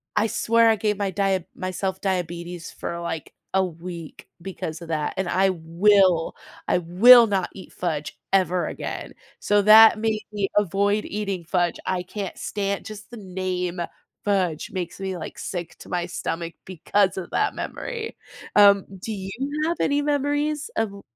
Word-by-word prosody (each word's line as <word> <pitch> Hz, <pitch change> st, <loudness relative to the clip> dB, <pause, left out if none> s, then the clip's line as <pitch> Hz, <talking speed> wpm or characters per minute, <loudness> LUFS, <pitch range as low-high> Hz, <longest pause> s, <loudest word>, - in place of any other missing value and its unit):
I 215 Hz, +2 st, +3 dB
swear 230 Hz, +1 st, +3 dB
I 225 Hz, -, +4 dB
gave 210 Hz, 0 st, 0 dB
my 200 Hz, -1 st, -1 dB
dia 190 Hz, -2 st, 0 dB
myself 185 Hz, +1 st, -3 dB
diabetes 175 Hz, -2 st, -3 dB
for, 170 Hz, -, -5 dB
like, 165 Hz, -2 st, -5 dB, 0.2 s
a 190 Hz, 0 st, +4 dB
week 170 Hz, -1 st, -8 dB
because 170 Hz, -3 st, -5 dB
of 165 Hz, -, -9 dB
that. 155 Hz, -2 st, -1 dB
And 190 Hz, -2 st, -1 dB
I 190 Hz, +1 st, +3 dB
will 180 Hz, +1 st, +3 dB, 0.3 s
I -, -, +3 dB
will 230 Hz, +9 st, +8 dB
not 190 Hz, -3 st, 0 dB
eat 190 Hz, -, -12 dB
fudge 155 Hz, -4 st, -3 dB, 0.2 s
ever 185 Hz, -2 st, +2 dB
again. -, -, -6 dB, 0.3 s
So 205 Hz, 0 st, +3 dB
that 220 Hz, +1 st, +9 dB
made 220 Hz, -1 st, 0 dB
me 200 Hz, -2 st, -1 dB
avoid 205 Hz, +2 st, +2 dB
eating 200 Hz, -4 st, -3 dB
fudge. 175 Hz, -1 st, 0 dB
I 185 Hz, -1 st, -1 dB
can't 195 Hz, +2 st, -6 dB
stan 200 Hz, -1 st, -2 dB
just 210 Hz, -1 st, -9 dB
the 240 Hz, -, -8 dB
name 185 Hz, -2 st, -3 dB, 0.4 s
"fudge" 185 Hz, -6 st, 0 dB
makes 180 Hz, -1 st, -5 dB
me, 190 Hz, -2 st, -3 dB
like, -, -, -7 dB
sick 175 Hz, -3 st, -5 dB
to -, -, -12 dB
my 175 Hz, -1 st, -1 dB
stomach 170 Hz, -1 st, -4 dB
because 190 Hz, +2 st, +1 dB
of 185 Hz, -, -5 dB
that -, -, +1 dB
memory. 460 Hz, -2 st, -5 dB, 0.4 s
Um, 200 Hz, -1 st, +7 dB
do 220 Hz, -, -5 dB
you 195 Hz, -1 st, -6 dB, 0.4 s
have 340 Hz, -, -1 dB
any 285 Hz, +1 st, +2 dB
memories 290 Hz, +1 st, 0 dB
of 200 Hz, -3 st, -2 dB
190 Hz, 160 wpm, -24 LUFS, 175-210 Hz, 0.4 s, that